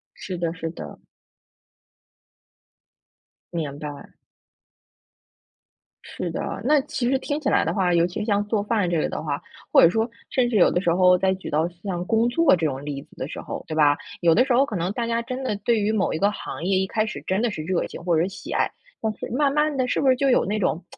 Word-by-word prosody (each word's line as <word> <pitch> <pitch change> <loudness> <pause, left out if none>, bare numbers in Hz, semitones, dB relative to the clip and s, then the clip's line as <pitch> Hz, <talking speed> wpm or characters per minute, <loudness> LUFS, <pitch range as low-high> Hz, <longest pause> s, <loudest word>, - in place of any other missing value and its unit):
是 185 -3 -6
的 170 -1 -1
是 165 -1 -4
的。 - - -9 2.5
明 150 -4 -3
白。 145 -1 -8 1.9
是 180 - -5
的。 165 - -4
那 295 +3 +4
其 280 -4 -2
实 270 - +2
听 290 +3 -3
起 285 - -1
来 - - +3
的 - - 0
话 185 -3 +1
尤 170 0 +4
其 180 - -4
像 205 -2 +1
做 210 -1 0
饭 205 -3 0
这 170 - +1
个 - - 0
的 - - -4
话， 145 -2 -2 0.3
或 - - +8
者 170 - +8
说 225 +5 0 0.2
甚 250 -2 +2
至 225 - 0
有 180 - +6
的 - - +1
时 175 -3 +2
候， 180 0 +5
在 190 +1 +2
举 190 - -8
到 155 +2 +2 0.2
像 180 -3 -3
工 225 +1 +2
作 320 - +4
这 165 -3 0
种 135 -1 -4
例 145 -2 -4
子 - - -21
的 130 - -4
时 - - -7
候 - - -6
对 160 - -5
吧。 145 -2 +4 0.2
有 170 -2 +4
的 250 - +5
时 260 - 0
候 260 +3 +5
可 220 - -4
能 180 +3 -1
大 235 +1 -2
家 230 0 0
真 255 +3 -5
的， 210 -6 -1
对 235 -2 +3
于 205 +1 +1
某 210 -3 +1
一 - - -1
个 200 +4 +3
行 160 -8 -7
业， 190 +1 +2
一 190 - +1
开 215 +3 0
始 - - -6
真 190 +2 +1
的 240 0 +1
是 155 - -5
热 175 +2 -1
情， - - -9
或 170 -2 +2
者 175 - +1
喜 195 - -8
爱。 - - +1 0.3
但 220 -1 -1
是 - - -6
慢 280 +3 +2
慢 300 0 +1
的， 255 -1 +1
是 - - 0
不 270 - +2
是 260 - +6
就 275 +2 +1
有 - - +4
那 210 +2 -1
种 180 -3 -1
195 Hz, 255 characters per minute, -24 LUFS, 170-235 Hz, 2.5 s, 或